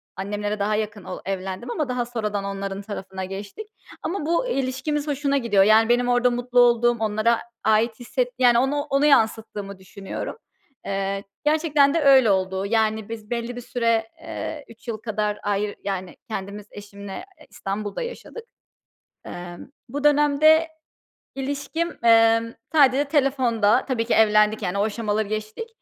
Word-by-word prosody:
annemlere 205 +2 -3
daha 210 +1 +1
yakın 215 -1 -3
ol 185 - -7
evlendim 195 +4 -4
ama 295 +1 -2
daha 250 -1 -1
sonradan 210 -4 -3
onların 195 0 -4
tarafına 190 -2 -6
geçtik. 200 - -8 0.4
Ama 355 -3 -3
bu 340 +10 +1
ilişkimiz 275 - -2
hoşuna 280 -1 0
gidiyor, 215 -6 +3
yani, 220 +2 +5
benim 245 +1 +3
orada 245 0 +3
mutlu 245 0 0
olduğum, 240 0 +4
onlara 220 +2 +1 0.2
ait 220 +2 +2
hisset - - -1
Yani, 240 -2 +5
ona 285 +3 0
onu 285 0 +1
yansıttığımı 220 -6 +1
düşünüyorum. 195 - -7 0.5
Eee, 195 0 -2 0.2
gerçekten 300 -2 +3
de 330 - +1
öyle 265 -6 +6
oldu. 190 0 0
Yani, 220 0 0
biz 220 -2 -8
belli 240 0 -3
bir 245 - -6
süre, 230 -2 0
eee, 300 -3 -6
3 230 +1 -17
yıl 225 -2 -3
kadar 210 -1 -2
ayrı 205 0 -1
yani, 190 -2 -4
kendimiz 200 -1 -6
eşimle, 200 - -9
eee, - - -17
İstanbul'da 205 - -4
yaşadık. 475 -1 -7 0.8
Emm, 175 +3 -8 0.2
bu 285 +4 -5
dönemde 295 +2 +5 0.7
ilişkim, 285 +5 -3
emm, 230 0 +5 0.2
sadece 280 -2 +5
telefonda 260 -6 +2
Tabii 240 -4 0
ki 240 - +1
evlendik, 210 0 +4
yani 190 +1 -2
o - - +2
aşamaları 215 -1 -1
geçtik. 215 - -5
225 Hz, 150 wpm, -23 LUFS, 205-270 Hz, 0.8 s, öyle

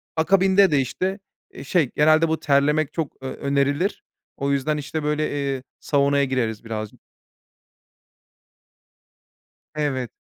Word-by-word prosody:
akabinde 190 +2 +4
de, 145 - +3
işte, 185 - -2 0.3
eee, 135 - -9
şey, 145 -2 +1
genelde 155 +2 +4
bu 160 0 -1
terlemek 145 +1 +2
çok, 160 -4 -3
eee, 130 - -3
önerilir. 140 +6 -1 0.3
O 140 0 -1
yüzden, 140 +2 0
işte, 150 +1 -4
böyle, 150 +1 0
eee, 140 -2 -2 0.2
saunaya 140 -1 +2
gireriz 120 -5 -2
birazcık. 110 -2 -6 2.8
Evet. 135 -6 -2
145 Hz, 115 wpm, -23 LUFS, 135-155 Hz, 2.8 s, akabinde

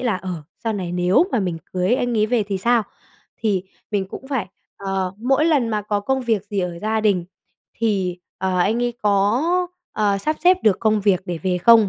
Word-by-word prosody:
là, 235 -6 +1
ờ, 185 +1 -6 0.3
sau 225 - +1
này 185 -4 -3
nếu 180 - +3
mà 235 - +2
mình 180 -4 -2
cưới 185 +6 +2
anh 245 -2 0
ấy 215 - +3
về 235 0 +2
thì 200 -2 -3
sao? 235 +3 +3 0.5
Thì 200 -5 0 0.3
mình 200 -3 0
cũng 265 - -9
phải, 255 -9 -1 0.3
ờ, 195 -1 -2
mỗi 270 +6 +2
lần 290 -8 +3
mà 210 -2 -1
có 205 0 -1
công 265 +5 0
việc 225 -5 0
gì 205 - -2
ở 175 -1 -3
gia 220 +3 0
đình 200 -5 +2 0.5
thì, 195 -5 0 0.2
ờ, 185 -1 0
anh 220 +7 +2
ấy 240 - 0
có, 205 +4 +3 0.5
ờ, 205 -2 +1
sắp 305 +9 -1
xếp 365 +1 +7
được 210 -4 +3
công 215 -1 +2
việc 195 -2 +3
để 175 -2 -4
về 180 0 0
không? 225 +1 +6
210 Hz, 210 wpm, -21 LUFS, 190-230 Hz, 0.5 s, xếp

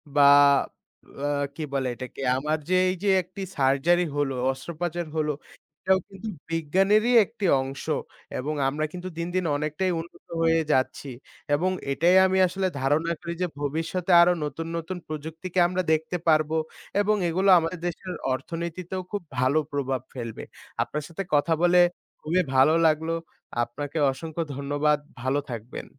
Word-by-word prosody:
বা 145 - +5 1.0
অ্যা 145 +1 -1 0.3
কি 160 - -4
বলে 135 -2 0
এটাকে? 130 +2 -8 0.2
আমার 150 +3 0
যে - - +2 0.2
এই 185 - -1
যে 205 - +2
একটি 185 +2 -10 0.2
সার্জারি 140 +6 +3
হলো, 145 -2 0 0.2
অস্ত্রপাচার 170 +5 -4
হলো, 155 -1 +1 0.5
এটাও 190 0 +3
কিন্তু 195 +2 -9 0.2
বিজ্ঞানেরই 195 +9 +2
একটি 215 -1 -5 0.2
অংশ। 135 +1 -6 0.5
এবং 145 +4 -2
আমরা 150 +3 -1
কিন্তু 180 0 -6
দিন, 170 0 -2
দিন 185 -1 +1
অনেকটাই 155 +5 -1
উন্নত 170 +1 -11
হয়ে 165 0 +3
যাচ্ছি। 130 +1 0 0.5
এবং 180 +5 +1 0.2
এটাই 170 +6 +3
আমি 190 0 +2
আসলে 190 +1 -1
ধারণা 150 +5 +1
করি 170 - -4
যে 180 - +2
ভবিষ্যতে 165 +5 -2
আরো 175 +1 +5
নতুন, 150 +3 -4
নতুন 170 +3 -5
প্রযুক্তিকে 160 +4 -4
আমরা 180 +1 -1
দেখতে 160 +3 -1
পারবো 155 0 +3 0.5
এবং 210 +1 +2
এগুলো 190 +4 +2
আমাদের 165 +2 -3
দেশের 180 +2 -5 0.2
অর্থনীতিতেও 170 +5 -4
খুব 205 - -2 0.2
ভালো 130 +4 +3
প্রভাব 135 -3 -1
ফেলবে। 115 -3 -6 0.4
আপনার 150 0 -5
সাথে 170 +3 -5
কথা 145 +3 +3
বলে 175 0 +4 0.4
খুবই 170 +4 +1
ভালো 135 +4 +6
লাগলো। 160 +1 +1 0.5
আপনাকে 145 +6 -5
অসংখ্য 160 +4 -5
ধন্যবাদ। 145 +2 +1 0.2
ভালো 130 +3 +1
থাকবেন। 115 +1 -6
160 Hz, 150 wpm, -26 LUFS, 145-180 Hz, 1.0 s, ভালো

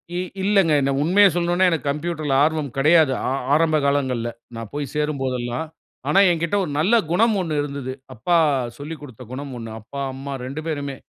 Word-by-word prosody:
இ - - -1 0.3
இல்லங்க. 195 -4 +3
என்ன 135 0 +1
உண்மையை 190 +7 +5
சொல்லணுன்னா 175 +1 +2
எனக்கு 155 -5 -1
கம்ப்யூட்டர்ல 155 -1 -2
ஆர்வம் 155 -3 0
கெடையாது. 155 +1 +5 0.2
ஆ - - +1 0.2
ஆரம்ப 155 0 +3
காலங்கள்ல. 130 -4 0 0.3
நான் 115 -2 -7
போய் 145 -3 -4
சேரும் 150 -2 -1
போதெல்லாம். 125 +2 -2 0.4
ஆனா 195 - +4
எங்கிட்ட 170 +2 -1
ஒரு 165 - -4
நல்ல 190 +10 +3 0.2
குணம் 220 +5 +3
ஒண்ணு 155 -4 -1
இருந்தது. 140 -3 -5 0.2
அப்பா 170 +10 +2 0.4
சொல்லிக்கொடுத்த 145 -5 -9
குணம் 135 +1 -6
ஒண்ணு. 115 -1 -7
அப்பா, 140 +6 -8
அம்மா 135 +1 -6
2 140 +4 -5
பேருமே, 140 -3 -3
150 Hz, 170 wpm, -22 LUFS, 135-165 Hz, 0.4 s, உண்மையை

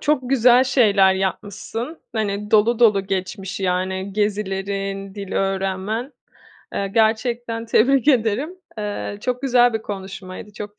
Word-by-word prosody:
çok 270 -4 0
güzel 250 0 +5
şeyler 205 -7 +4
yapmışsın. 205 - -4
Hani, 210 -2 -2
dolu 220 +2 +4
dolu 205 -5 +4
geçmiş, 195 +1 -4
yani, 190 +1 -1
gezilerin, 195 -1 -2
dil 200 -2 -7
öğrenmen. 195 +6 -2 0.6
Eee, 200 - -1
gerçekten 230 +1 0
tebrik 265 +5 +3
ederim. 265 - +1 0.2
Eee, 205 -1 -4
çok 250 +2 -2
güzel 245 -2 +4
bir 220 - -2
konuşmaydı. 195 0 -8
Çok 210 0 -9
210 Hz, 120 wpm, -21 LUFS, 195-240 Hz, 0.6 s, güzel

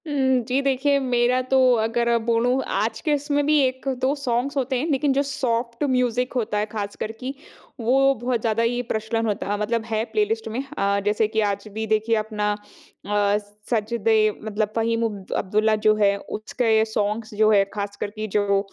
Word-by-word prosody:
उम, 265 -3 +2
जी 260 +2 +1
देखिए, 275 +1 +2
मेरा 250 -1 +2
तो 265 - +4 0.2
अगर 235 +1 +1
बोलूँ, 240 +3 +2
आज 220 +3 -1
के 305 - +1
इसमें 290 0 0
भी 300 0 +4
1-2 260 +1 -1
सॉन्ग्स 275 +1 -1
होते 265 0 0
हैं, 295 - -2
लेकिन 275 0 +2
जो 275 - +2
सॉफ्ट 245 -3 -2
म्यूज़िक 250 -1 0
होता 225 -4 -1
है, 210 - +1
ख़ास 205 -2 -4
कर 215 - -2
की, 260 +1 -4 0.5
वो 270 +4 +3
बहुत 245 -2 -1
ज़्यादा 225 0 +1
ही 240 +1 0
प्रचलन 220 +1 -1
होता, 205 -1 -1
मतलब 220 +2 -1
है 220 -1 -1
प्लेलिस्ट 220 +1 0
में। 230 +5 -3
अ, 200 0 +1
जैसे 210 +1 +2
कि 220 +1 -2
आज 200 +1 -6
भी 220 +1 -3
देखिए 220 +1 +2
अपना 210 -1 -1 0.5
अ, 205 0 +2 0.3
सजदे 225 -1 +1 0.3
मतलब 215 0 -2
फ़हीम 230 0 +1
अब 205 -4 -5
अब्दुल्ला 215 +3 +2
जो 215 - +7
है, 200 -1 +3
उसके 220 +2 0
सॉन्ग्स 220 0 -2
जो 215 +1 +4
हैं, 200 -2 +5
ख़ास 200 -1 -4
कर - - -1
की 215 0 -5
जो 200 -1 +2
230 Hz, 185 wpm, -23 LUFS, 215-255 Hz, 0.5 s, जो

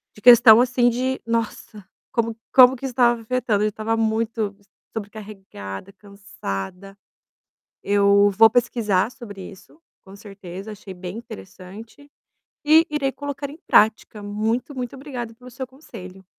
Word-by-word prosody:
de 210 - -16
questão 235 -1 +8
assim 245 -1 +2
de: 255 +2 -2
"Nossa, 225 -2 -4 0.3
como 230 -1 -1 0.2
como 255 0 +8
que 265 - -8
estava 240 -2 +2
afetando". 225 -3 -1
Eu - - +2
já - - 0
estava 220 +2 -3
muito 220 -2 -1 0.4
sobrecarregada, 195 - -9
cansada. 195 - -8 0.9
Eu 200 0 +4
vou 225 +3 +6
pesquisar 230 -4 0
sobre 205 -7 -11
isso, 195 - -17 0.2
com 195 +1 -14
certeza, 195 0 -10
achei 200 -2 -10
bem 180 +3 -7
interessante 220 - -12 0.6
e 315 +3 +5
irei 275 -3 -1
colocar 285 -1 -6
em 300 - -12
prática. 215 0 +2
Muito, 220 +6 -2
muito 250 0 -6
obrigado 250 -5 -7
pelo 250 +2 -14
seu 255 +2 -7
conselho. 195 - -13
220 Hz, 135 wpm, -22 LUFS, 200-245 Hz, 0.9 s, questão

